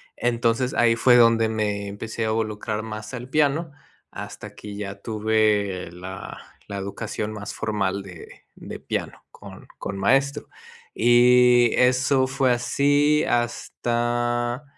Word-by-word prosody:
entonces 120 +1 0
ahí 115 -1 +4
fue 120 +1 +5
donde 115 -2 +5
me 105 -2 -2
empecé 110 +3 -6
a 110 - 0
involucrar 110 -1 -2
más 110 +1 -7
el 125 0 -7
piano, 155 +2 +1 0.4
hasta - - -9
que 105 -1 -9
ya 100 -1 -6
tuve 105 -5 0
la 90 +2 -8 0.3
la 100 -1 -5
educación 105 +2 -4
más 105 -1 -7
formal 100 -3 -2
de 90 -4 -11 0.3
de - - -9
piano - - -5
con - - -13
con 100 0 -5
maestro, 135 +7 +1 0.5
y 120 0 +5
eso 130 +1 +3
fue 130 0 +1
así 145 +5 +2
hasta 120 +1 -1
115 Hz, 125 wpm, -23 LUFS, 105-125 Hz, 0.5 s, fue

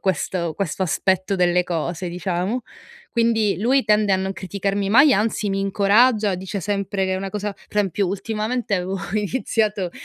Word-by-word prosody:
questo 175 -2 -1
questo 190 -1 -2
aspetto 190 +2 0
delle 180 -1 +2
cose, 175 +1 -3
diciamo. 180 +6 -2 0.5
Quindi 230 -3 +2
lui 260 +6 +3
tende 210 -2 +3
a - - +4
non 190 +1 -2
criticarmi 195 +1 -2
mai, 270 +5 +7
anzi 210 0 0
mi 195 - -1
incoraggia, 205 +2 +3
dice 190 +2 -5
sempre 200 0 -1
che 190 - 0
è - - -1
una 195 0 -4
cosa 210 0 -3
pre 210 - -3
esempio, 195 0 0
ultimamente 215 +3 -2
avevo 185 +1 -2 0.2
iniziato 210 -3 -1
195 Hz, 160 wpm, -22 LUFS, 185-215 Hz, 0.5 s, mai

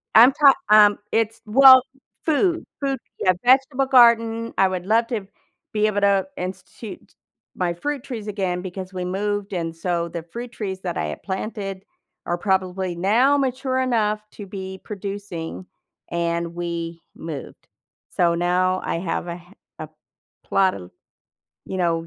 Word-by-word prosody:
I'm 235 +4 +9
talk 280 -2 +6
um, 210 -1 +7
it's 225 0 0
well, 260 +3 +8 0.4
food 335 +2 +1 0.2
food, 275 -1 -1 0.2
yeah, 185 - +3
vegetable 265 +2 +3
garden, 230 -3 +4
I 195 - +5
would 185 -1 -4
love 225 +3 +2
to 220 -6 -4 0.5
be 215 0 +2
able 205 -1 -1
to 200 +1 +3
institute 190 +3 -8 0.4
my 175 -2 -1
fruit 280 +9 -4
trees 230 -6 -6
again 190 -4 -2
because 185 0 -7
we 180 -1 -4
moved 205 +2 -2
and 165 -2 -3
so 170 0 -1
the 170 -1 -6
fruit 235 +8 -8
trees 195 -5 -5
that 175 -2 -4
I - - -1
had 75 - -7
planted 195 -1 -5 0.4
are 175 - -1
probably 185 -1 -1
now 230 +11 +3
mature 260 -1 -1
enough 220 -5 +1
to 205 - -9
be 190 -1 -7
producing 195 -4 -6 0.5
and 170 0 -1
we 170 -1 -4
moved. 155 -4 -8 0.4
So, 170 -1 +2
now 180 +2 +1
I 165 - -2
have 175 0 -3
a 170 - -3
h 175 - -13 0.4
a - - -6 0.6
plot 190 -1 +2
of, 90 -1 -10 0.8
you 190 - -4
know, 165 -2 0
195 Hz, 150 wpm, -22 LUFS, 175-230 Hz, 0.8 s, I'm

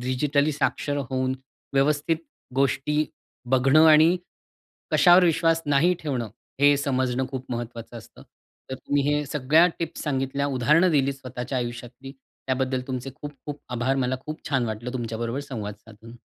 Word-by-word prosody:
Digitally 140 +4 +1
साक्षर 145 0 -1
होऊन, 130 0 0 0.4
व्यवस्थित 145 +3 +2 0.4
गोष्टी 140 +3 +1 0.5
बघणं 135 +4 +5
,आणि 160 +3 +6 0.8
कशावर 180 0 +6
विश्वास 165 0 +2
नाही 145 +5 +3
ठेवणं, 130 -7 -3 0.3
हे 145 0 +6
समजणं 130 -2 0
खूप 130 -1 -5
महत्वाचं 120 0 -6
असतं. - - -15 0.5
तर - - -2
तुम्ही 140 +2 -1
हे 145 0 +1
सगळ्या 150 +5 +4
टिप्स 165 -1 -4
सांगितल्या 140 -1 -1
उदाहरणं 150 +7 +3
दिलीत 140 -3 +2
स्वतःच्या 130 -1 -5
आयुष्यातली. 120 +2 -6 0.3
त्याबद्दल 130 0 0
तुमचे 130 0 -4
खूप-खूप 145 0 -8
आभार. 125 +3 0
मला 130 0 0
खूप 155 +1 -6
छान 135 -4 +1
वाटलं 115 +3 -5
तुमच्याबरोबर 115 +1 -3
संवाद 105 -5 -4
साधून. 115 +2 -14
135 Hz, 135 wpm, -25 LUFS, 125-150 Hz, 0.8 s, आणि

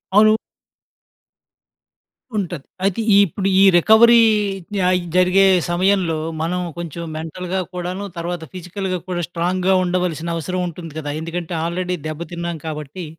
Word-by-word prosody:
అవును. 215 +1 +6 2.0
ఉంటది. 175 -8 -3 0.2
అయితే, 195 +2 +1
ఈ - - +7
ఇప్పుడు 195 +2 -3
ఈ - - +6
రికవరీ 220 +6 +7 0.6
య 185 - +1 0.3
జరిగే 185 +1 +5 0.3
సమయంలో, 180 -2 +1 0.2
మనం 180 +3 -1 0.2
కొంచెం 170 -1 -6
మెంటల్‌గా 180 +4 -4
కూడాను, 180 +2 -4
తర్వాత 170 0 -4
ఫిజికల్‌గా 185 +1 -4
కూడా, 180 -1 -2
స్ట్రాంగ్‌గా 180 +2 0
ఉండవలసిన 175 -2 -1
అవసరం 180 +3 -3
ఉంటుంది 165 -1 -8
గదా! 145 -2 -4
ఎందుకంటే, 170 +1 -5
ఆల్రెడీ 180 +1 -2
దెబ్బ 155 0 -5
తిన్నాం 170 -1 -4
కాబట్టి, 155 +3 -6
180 Hz, 125 wpm, -20 LUFS, 170-185 Hz, 2.0 s, ఈ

